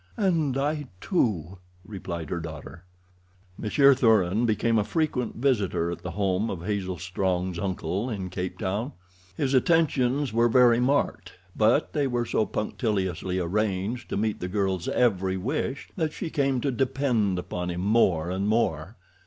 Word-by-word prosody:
"And 165 -9 +1
I, 145 +1 -1
too," 95 - -1 0.3
replied 90 -6 -6
her 85 - -1
daughter. 80 +1 -9 0.7
Monsieur 140 +7 +4
Thuran 110 -3 +3
became 115 +1 +2
a - - +2
frequent 140 -3 -1
visitor 105 -10 +1
at 85 - -6
the 90 - -5
home 95 +3 0
of 85 -2 -5
Hazel 95 -3 -2
Strong's 90 0 -2
uncle 95 +3 -2
in 95 -5 -4
Cape 90 0 -4
Town. 105 +9 -2 0.4
His 135 -2 0
attentions 140 -3 +2
were 115 +1 +3
very 120 -1 +5
marked, 125 -9 0 0.2
but 115 +7 +2
they 145 -2 +1
were 120 -2 -1
so 110 -2 0
punctiliously 95 -5 -2
arranged 100 +5 -1
to - - -2
meet 110 +1 -1
the 90 - -3
girl's 95 -2 -1
every 95 -6 +1
wish 135 +6 -3
that 160 -3 -1
she 165 - -5
came 135 -4 +1
to 140 - 0
depend 125 -6 0
upon 90 0 -4
him 90 0 -3
more 95 -5 +2
and 95 +2 -1
more. 100 -4 0
105 Hz, 155 wpm, -26 LUFS, 90-125 Hz, 0.7 s, very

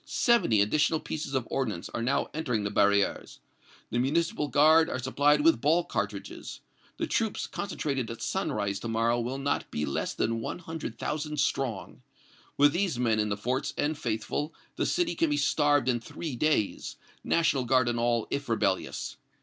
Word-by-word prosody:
Seventy 235 - +3
additional 150 +9 +2
pieces 150 -4 -4
of 130 -3 -1
ordnance 110 -9 -2
are 120 - -4
now 130 +4 0
entering 125 -9 -1
the 100 - -2
barrières. 100 -1 +1 0.5
The 120 - 0
Municipal 150 +3 0
Guard 155 +3 +5
are - - -2
supplied 145 +3 +2
with 160 -6 +4
ball 165 +4 +3
cartridges. - - -5 0.4
The - - -1
troops 220 -2 -1
concentrated 140 - -3
at 115 - -6
sunrise 105 - -1
to - - -5
morrow 115 +1 +1
will 125 +3 -3
not 140 +1 -1
be 75 - -2
less 70 - -2
than 115 0 0
one 115 - -4
hundred 165 -2 -6
thousand 150 0 -3
strong. 125 -8 -2 0.6
With 145 0 +5
these 180 -6 0
men 115 -3 +1
in 105 0 +1
the 100 - -1
forts 125 +6 -2
and 150 +2 0
faithful, 120 +5 -3 0.2
the - - 0
city 350 -1 +1
can 330 -1 +1
be 295 - +1
starved 145 - +2
in 120 -2 +2
three 135 +4 -6
days, 135 -6 0 0.3
National 160 -5 +2
Guard 130 0 +3
and 120 -1 0
all, 120 -1 +1
if 140 -2 -3
rebellious. 100 -4 -1
135 Hz, 175 wpm, -28 LUFS, 115-155 Hz, 0.6 s, Guard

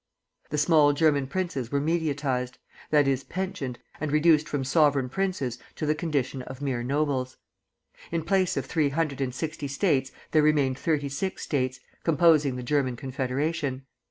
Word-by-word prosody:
The 150 - -2
small 150 -1 +5
German 145 -3 +2
princes 140 -7 -3
were 140 - +1
mediatized; 145 -5 -1 0.3
that 145 -2 +4
is, 135 -1 +1
pensioned, 185 -10 -4 0.2
and 155 -1 -2
reduced 155 0 +4
from 145 -2 -1
sovereign 140 -2 +3
princes 140 -8 -2 0.2
to - - -3
the 150 - +3
condition 145 -5 -2
of 130 +1 -9
mere 135 -4 -2
nobles. 135 -1 -1 0.7
In 165 -1 -1
place 185 -2 +2
of 135 - -1
three 155 0 +1
hundred 145 -2 -1
and 130 -2 0
sixty 155 +2 -4
States 140 -2 +1 0.2
there 155 - +5
remained 145 -3 +2
thirty 150 -3 0
six 165 +8 -3
States, 130 -3 -1 0.2
composing 155 -4 +4
the 125 - -5
German 130 -1 +1
Confederation. 135 +2 -2
145 Hz, 155 wpm, -27 LUFS, 130-155 Hz, 0.7 s, small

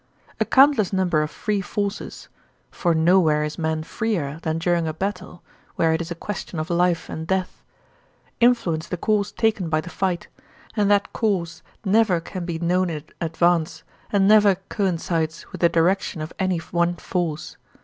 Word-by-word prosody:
A - - +2
countless 270 -7 +5
number 185 -5 +1
of 150 - -2
free 205 +3 -2
forces 200 +2 -4 0.4
(for 170 -2 0
nowhere 160 -2 +4
is 150 +1 -4
man 160 -1 -1
freer 165 -6 -2
than 160 0 -1
during 170 0 +1
a 155 - -3
battle, 185 -1 -5 0.3
where 165 -1 +2
it 160 - 0
is 170 - -5
a 170 - -4
question 185 -2 -5
of 155 +3 -3
life 175 0 +1
and 160 0 -6
death) 190 0 -2 0.8
influence 185 -10 +2
the 180 - -3
course 210 +2 0
taken 215 -6 0
by 155 0 +2
the 175 +3 -7
fight, 185 -3 -2 0.5
and 205 -2 +2
that 205 -1 +2
course 175 -7 -1 0.2
never 200 -3 +3
can 175 +2 -6
be 170 -2 -3
known 180 +2 +1
in 155 -3 -5 0.2
advance 165 -1 +1 0.3
and 195 -2 +3
never 205 -2 +6
coincides 165 -4 -1
with - - -8
the 170 - +5
direction 170 +1 +1
of 155 +1 -6
any 185 -2 +1
one 170 +1 0
force. 170 -4 -3
175 Hz, 170 wpm, -23 LUFS, 160-195 Hz, 0.8 s, never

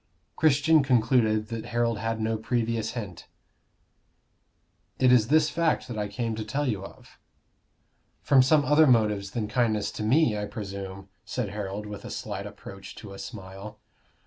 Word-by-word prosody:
Christian 155 +1 +4
concluded 115 -4 +2
that 115 -1 -5
Harold 115 -1 0
had 115 +1 -2
no 110 +1 0
previous 115 0 -1
hint. 105 -8 -7 1.7
"It 130 -1 +4
is 115 -3 +5
this 155 +2 +3
fact, 165 -6 0
that 120 -3 -6
I 105 - -1
came 115 +2 -3
to 110 - -3
tell 140 +7 -2
you 105 -6 -2
of." - - -14 1.0
"From 135 +6 +6
some 145 +3 +4
other 150 +1 +5
motive 105 -5 +2
than 110 -2 -2
kindness 110 -3 0
to - - -7
me, 120 +2 +3
I 105 0 -2
presume," 100 -2 -7
said 125 -5 -3
Harold, 100 0 -5
with 105 -1 -8
a - - -7
slight - - -5
approach 100 0 -11
to 100 -3 -10
a 95 - -10
smile. 100 -1 -9
110 Hz, 160 wpm, -27 LUFS, 105-125 Hz, 1.7 s, From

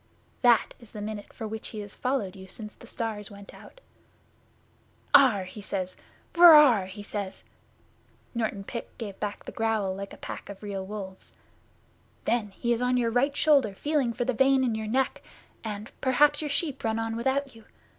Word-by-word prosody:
That 240 -2 +4
is 235 -3 -15
the 215 - -7
minute 210 0 -6
for 225 - -6
which 220 +1 -5
he 215 - -7
has 205 0 -8
followed 250 -7 -2
you 190 0 -11
since 210 +2 -5
the 235 - -15
stars 220 -3 -4
went 200 -1 -12
out. - - -15 1.3
"Aarh!" 245 -9 +6
he 195 +3 -9 0.7
"Wurr 340 -2 +10
aarh!" 245 -11 +6
he 205 +2 -9
says.' 200 -2 -5 0.9
(Norton 220 -4 -2
Pit 235 +3 -6
gave 205 -4 -7
back 210 -1 -4
the - - -6
growl 220 -4 0
like 195 +1 -6
a - - -10
pack - - -8
of 200 +1 -9
real 200 -2 -4
wolves.) 190 -1 -8 0.9
'Then 230 -3 +1
he 235 +4 -1
is 235 - -2
on 250 0 +2
your 235 -2 +1
right 275 +4 +1
shoulder 275 -11 +4
feeling 290 -1 0
for 240 +1 -2
the 255 - +1
vein 265 +2 +4
in 240 -3 +1
your 220 0 -3
neck, 260 +4 0 0.4
and 210 0 -6
perhaps 290 +3 +4
your 300 - -3
sheep 285 -1 -2
run 220 0 0
on 225 0 -2
without 265 +3 -1
you. 225 -1 -16
225 Hz, 185 wpm, -27 LUFS, 205-260 Hz, 1.3 s, Wurr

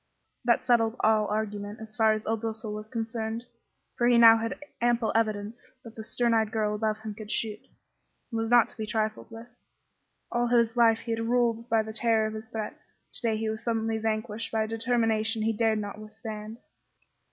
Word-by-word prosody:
That 235 -1 +3
settled 230 -2 +3
all 215 -1 +3
argument, 210 -1 -3
as 220 -1 -10
far 220 -1 +4
as 215 0 -4
Il 225 +1 0
Duca 220 0 -4
was 215 +1 -6
concerned; 225 0 -3 0.5
for 240 - +2
he 240 -1 +5
now 230 -1 +9
had 230 0 -3 0.2
ample 240 -1 +2
evidence 215 0 -1 0.2
that 230 -3 -11
the 220 - -7
stern 235 +1 +1
eyed 220 -1 +2
girl 215 -1 0
above 215 0 -1
him 215 -1 -5
could 210 0 -10
shoot, 215 -1 -2 0.7
and 225 -1 -1
was 225 - -2
not 240 -1 +6
to - - -13
be 215 -1 -4
trifled 215 0 -2
with. 225 0 -9 0.9
All 240 0 +1
his 235 -1 +3
life 230 -2 +4
he 230 - -5
had 225 0 -1
ruled 235 -1 +1
by 225 -1 +3
the 220 0 -7
terror 225 -1 +2
of 215 - -3
his 220 0 -8
threats; 220 -2 -7 0.2
to - - -9
day 225 -2 +1
he 220 0 -2
was 220 - -6
suddenly 225 -1 0
vanquished 220 0 -2
by 220 -1 +1
a - - -3
determination 225 -1 +1
he 225 +1 +1
dared 220 0 +2
not 205 0 -5
withstand. 215 0 -8
220 Hz, 200 wpm, -28 LUFS, 215-230 Hz, 0.9 s, now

